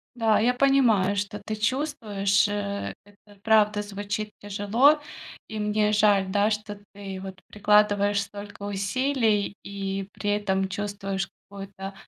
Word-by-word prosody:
Да, 225 -2 +3
я 245 +3 +3
понимаю, 245 -8 +3
что 205 +1 -3
ты 215 - -3
чувствуешь. 215 -5 +1
Э, 200 -1 -3
это 205 0 -21
правда 210 -1 +4
звучит 205 +1 -4
тяжело. 210 +9 +3 0.5
И 220 -1 -6
мне 210 0 +1
жаль, 205 -2 +4
да, 205 +2 +2
что 210 -1 -4
ты, 195 -2 -7
вот, 190 -1 -8
прикладываешь 205 -1 +3
столько 205 0 -9
усилий 205 +1 0
и 195 0 -4
при 205 -1 -2
этом 195 -2 0
чувствуешь 195 -1 -3 0.2
какую-то 195 -1 -8
205 Hz, 130 wpm, -26 LUFS, 200-215 Hz, 0.5 s, правда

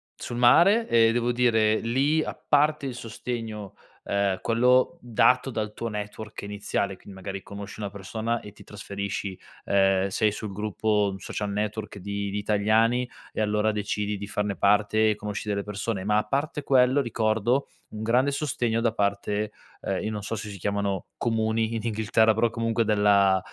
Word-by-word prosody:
sul 120 - -6
mare, 175 - +5
e 115 -1 +5
devo 120 +1 +1
dire 110 -3 +3
lì, 140 +7 +1
a - - -4
parte 150 -1 +1
il 125 - -5
sostegno, 115 -3 -6 0.3
ehm, 100 -2 0
quello 125 +7 +3
dato 125 +2 +3
dal 110 -2 -3
tuo 115 - -4
network 105 0 -6
iniziale, 100 -1 -2
quindi 100 - -13
magari 95 +1 -6
conosci 100 +1 -9
una 100 -1 -4
persona 110 +4 -3
e 105 -1 -11
ti - - -15
trasferisci, 100 -2 -5 0.3
ehm, 95 -1 +3
sei 105 +2 +1
sul 105 0 -6
gruppo 105 0 0
Social 100 +2 -4
Network 105 0 -3
di 100 +1 -4
di 100 - -3
italiani 110 +4 +2 0.2
e - - -5
allora 105 0 +1
decidi 105 0 -2
di 100 - -6
farne 100 0 -2
parte 105 +2 +3
e 105 - -1
conosci 105 0 -5
delle 100 -1 0
persone, 105 0 -3
ma 105 +1 +2
a 105 - +2
parte 145 +6 -2
quello 130 +1 +4
ricordo 115 +2 0 0.3
un 105 - -6
grande 125 +5 +2
sostegno 120 -5 -1
da 115 - +2
parte, 105 0 -1 0.3
ehm, - - -2
io 110 - -1
non 105 -2 -4
so 110 - -4
se 105 0 -6
si 100 - -8
chiamano 100 0 -2
"comuni" 110 0 0
in 115 - -2
Inghilterra, 110 0 +2
però 115 +2 +2
comunque 115 0 0
della 100 -2 +4
110 Hz, 170 wpm, -26 LUFS, 100-115 Hz, 0.3 s, mare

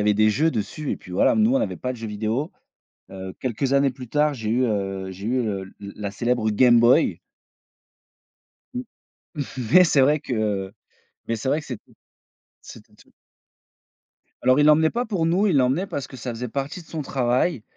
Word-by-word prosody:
avait 105 0 +3
des 110 +1 +4
jeux 155 +8 +2
dessus, 125 +5 -4
et - - -1
puis 90 - -13
voilà. 90 - +3
Nous, 220 +3 +3
on - - +4
n'avait 280 - -2
pas 125 0 -3
de - - -9
jeux 115 - -6
vidéo. 110 +8 -2 0.6
Heu, 95 -1 -8
quelques 130 +2 -2
années 140 0 +3
plus 125 -1 -10
tard, 150 +3 +2
j'ai 110 -4 -5
eu 125 +3 +2
heu, 95 -3 -2
j'ai 95 +2 -8
eu 125 +2 +1
le 100 -3 -3
la 100 0 -9
la 105 -1 -4
célèbre 120 +2 0
Game 120 +2 +5
Boy 120 +7 +4 1.5
Mmh. 250 - -3 0.9
Mais 185 - +9
c'est 150 -5 +3
vrai 150 +3 +3
que 105 -7 -2 0.6
mais 115 - 0
c'est 130 +4 -3
vrai 150 - +1
que - - -14
c'ést 125 -5 -5 0.8
c'était - - -14
tout - - -22 1.3
Alors, 130 +2 +4
il 145 - +5
l'emmenait 155 +1 +5
pas 245 +1 -1
pour 190 -7 -1
nous, 185 +6 +2
il 170 - +2
l'emmenait 135 +9 +1
parce 140 - -4
que - - -11
ça 125 - -6
faisait 120 +2 -5
partie 140 - -4
de - - -24
son 160 - -5
travail 130 0 0
125 Hz, 195 wpm, -23 LUFS, 110-150 Hz, 1.5 s, Mais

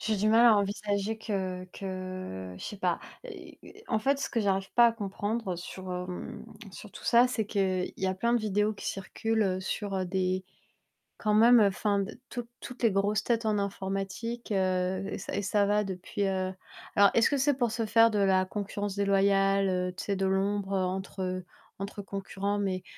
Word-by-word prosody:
J'ai 220 -2 0
du 210 +2 +1
mal 230 +2 +6
à 225 -3 +7
envisager 205 +1 -1
que 190 -4 -3
que 185 - -6
je - - -8
sais 210 - -6
pas. 180 -3 0 0.3
Heu, - - -10 0.3
en 220 - +2
fait, 275 +5 +1
ce 280 - -2
que 230 - 0
j'arrive 195 -2 0
pas 240 0 +7
à 230 - +3
comprendre 205 -2 -3
sur, 185 +1 -7
hem, 180 0 -6 0.3
sur 205 +3 -11
tout - - -12
ça, 240 +1 +6
c'est 225 -4 -1
qu'il 190 -3 0
y 190 - -1
a 185 - 0
plein 235 +5 0
de 240 - +3
vidéos 210 0 +1
qui 205 - -8
circulent 195 0 -1
sur, 200 +1 -3
heu, 185 - 0
des 185 0 -1 0.7
quand 210 -1 0
même, 235 +3 +7
enfin, 200 0 +2
d 195 +2 -4
toutes 240 -2 -6
toutes 250 - -9
les 230 - +5
grosses 205 +2 +1
têtes 230 -1 0
en 215 -1 +2
informatique, 200 +4 -4
heu 185 0 0
et - - -3
ça 195 - -5
et - - 0
ça 205 +1 +2
va 210 +1 +2
depuis, 190 +2 -3
heu 185 -1 -1 0.4
alors, 200 0 +6
est-ce 230 - +5
que 285 - +1
c'est 280 +1 +2
pour 240 -4 +1
se 225 0 -1
faire 225 +1 +5
de 210 - 0
la 190 -1 +3
concurrence 205 0 -4
déloyale, 195 0 +3
heu, 180 0 -1
tu - - -6
sais, 200 - 0
de 195 - 0
l'ombre 195 +1 0
entre, 190 +1 -3
heu, 185 0 -3 0.3
entre 200 +1 -5
concurrents? 200 0 -3
Mais 185 -2 -1
200 Hz, 200 wpm, -29 LUFS, 190-215 Hz, 0.7 s, à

